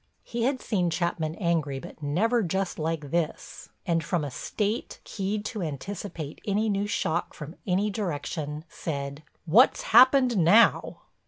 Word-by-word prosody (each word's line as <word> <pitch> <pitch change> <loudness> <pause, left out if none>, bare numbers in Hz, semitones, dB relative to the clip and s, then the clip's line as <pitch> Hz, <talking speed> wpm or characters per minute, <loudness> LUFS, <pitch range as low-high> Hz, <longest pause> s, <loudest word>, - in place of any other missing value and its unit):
He 235 0 -2
had 265 0 0
seen 180 -6 0
Chapman 165 -1 -1
angry 165 -7 0
but 165 +3 -10
never 210 +12 +1
just 190 -1 -2
like 155 -2 -3
this, 170 -2 -3 0.2
and 165 -2 +1
from 170 0 -1
a 145 - -4
state, 210 - -3
keyed 205 +1 -3
to 210 -1 -4
anticipate 165 0 -6
any 210 +2 0
new 200 0 0
shock 175 -6 -1
from 155 +3 -8
any 200 +3 +1
direction, 155 -5 -4
said: 140 -2 -5 0.2
"What's 220 - +5
happened 255 0 +6
now?" 195 +7 +4
175 Hz, 145 wpm, -27 LUFS, 155-210 Hz, 0.2 s, happened